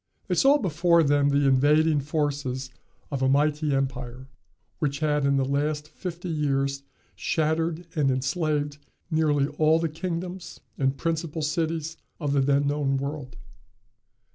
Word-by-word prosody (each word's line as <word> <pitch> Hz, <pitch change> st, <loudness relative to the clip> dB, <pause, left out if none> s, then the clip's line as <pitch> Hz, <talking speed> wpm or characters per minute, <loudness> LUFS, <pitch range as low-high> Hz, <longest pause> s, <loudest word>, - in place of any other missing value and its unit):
They -, -, 0 dB
saw 280 Hz, +1 st, +5 dB
before 170 Hz, -, +3 dB
them 145 Hz, -1 st, +3 dB
the 140 Hz, 0 st, +3 dB
invading 150 Hz, +3 st, +4 dB
forces 140 Hz, -3 st, -2 dB, 0.4 s
of 135 Hz, -2 st, -2 dB
a 130 Hz, -, +3 dB
mighty 150 Hz, +2 st, +2 dB
empire, 130 Hz, -1 st, -3 dB, 0.5 s
which 140 Hz, -2 st, -1 dB
had 150 Hz, -1 st, +1 dB
in 140 Hz, 0 st, +3 dB
the 135 Hz, -, +1 dB
last 150 Hz, +2 st, -1 dB
fifty 175 Hz, +1 st, -6 dB
years 140 Hz, -3 st, 0 dB, 0.3 s
shattered 160 Hz, +1 st, -1 dB
and 145 Hz, -3 st, +2 dB
enslaved 145 Hz, +2 st, -1 dB, 0.3 s
nearly 150 Hz, -3 st, +2 dB
all 155 Hz, +1 st, +5 dB
the 165 Hz, 0 st, -1 dB
kingdoms 175 Hz, +3 st, -5 dB, 0.2 s
and 135 Hz, 0 st, 0 dB
principal 165 Hz, -1 st, -2 dB
cities 160 Hz, 0 st, -2 dB, 0.2 s
of 145 Hz, -3 st, -1 dB
the 140 Hz, -, +3 dB
then 140 Hz, +1 st, +2 dB
known 140 Hz, -1 st, 0 dB
world. 140 Hz, -2 st, -5 dB
150 Hz, 140 wpm, -26 LUFS, 140-160 Hz, 0.5 s, saw